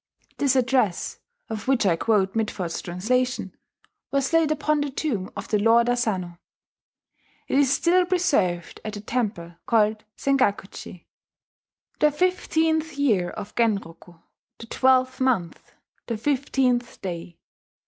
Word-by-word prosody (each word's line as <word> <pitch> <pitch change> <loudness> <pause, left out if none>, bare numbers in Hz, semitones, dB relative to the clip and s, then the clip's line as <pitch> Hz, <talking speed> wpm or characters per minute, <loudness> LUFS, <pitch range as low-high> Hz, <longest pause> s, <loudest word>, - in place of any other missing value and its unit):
This 275 -2 +2
address, 250 -7 +1 0.3
of 220 0 -6
which 260 -5 +2
I 180 -4 +4
quote 195 0 +1
Mitford's 205 -6 -2
translation, 250 +9 -1 0.5
was 275 +2 -1
laid 330 -2 +4
upon 305 0 +1
the 290 - -1
tomb 260 -9 -2
of 200 +2 -7
the 210 - +2
Lord 230 +3 +4
Asano. 190 -8 -1 1.1
It 275 - +2
is 275 -2 +3
still 350 +5 +3
preserved 275 - 0
at 215 - -5
the 205 - -6
temple 205 -7 -3
called 215 -2 +2
Sengakuji: 205 -9 -1 0.9
"The 300 - +5
fifteenth 320 -1 0
year 210 -11 +2
of 205 +3 -8
Genroku 195 -7 -1
[17031, 165 - -27 0.4
the - - -7
twelfth 260 +2 +2
month, 235 -10 -1 0.4
the 230 - -2
fifteenth 255 -1 0
day. 175 -2 -6
235 Hz, 130 wpm, -24 LUFS, 195-275 Hz, 1.1 s, The